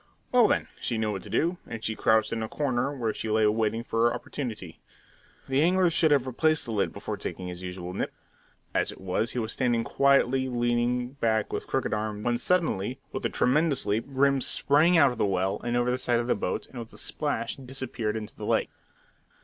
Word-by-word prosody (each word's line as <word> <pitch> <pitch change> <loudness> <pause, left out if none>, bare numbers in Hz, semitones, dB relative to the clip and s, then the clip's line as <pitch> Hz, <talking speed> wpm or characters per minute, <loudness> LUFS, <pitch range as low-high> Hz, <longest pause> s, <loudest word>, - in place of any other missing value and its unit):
Well 245 -3 +6
then, - - +1
she 120 - -1
knew 110 -1 0
what 95 -2 -4
to - - -11
do, 170 +2 0
and 110 -1 -7
she 110 - -1
crouched 110 0 +2
in 115 - -2
a 110 - -3
corner, 135 -1 -1
where 115 -3 -1
she 110 - -4
lay 110 0 +3
awaiting 110 +2 +1
her 115 +1 +3
opportunity. 115 - -6 0.7
The 135 +1 +2
angler 180 +1 +4
should 160 -1 +3
have 140 -3 +3
replaced 155 +5 +1
the 120 - -4
lid 105 -3 0
before - - -5
taking 90 -1 -5
his 90 0 -7
usual 90 0 -6
nip. - - -2 0.6
As - - +1
it - - -12
was, 95 +4 -1
he - - -5
was 110 -2 -1
standing 120 -3 +1
quietly 135 0 +3
leaning 120 0 0
back 110 -6 0
with - - -3
crooked - - -1
arm, 105 -1 -3
when 120 +1 +1
suddenly, 130 - 0
with 130 - -5
a - - -8
tremendous 140 +1 +2
leap, 105 +4 0
Grim 140 0 +3
sprang 155 +8 +3
out 140 -5 +6
of 120 - -7
the - - +3
well 95 +1 0
and 120 0 0
over 120 0 +2
the 125 - -1
side 120 -2 +1
of 120 - -1
the 120 - +2
boat, 100 - -2
and 125 - -10
with 115 -1 -8
a - - -13
splash - - -2
disappeared 125 -5 -3
into 105 -1 -7
the - - -6
lake. - - +1
120 Hz, 215 wpm, -27 LUFS, 110-135 Hz, 0.7 s, Well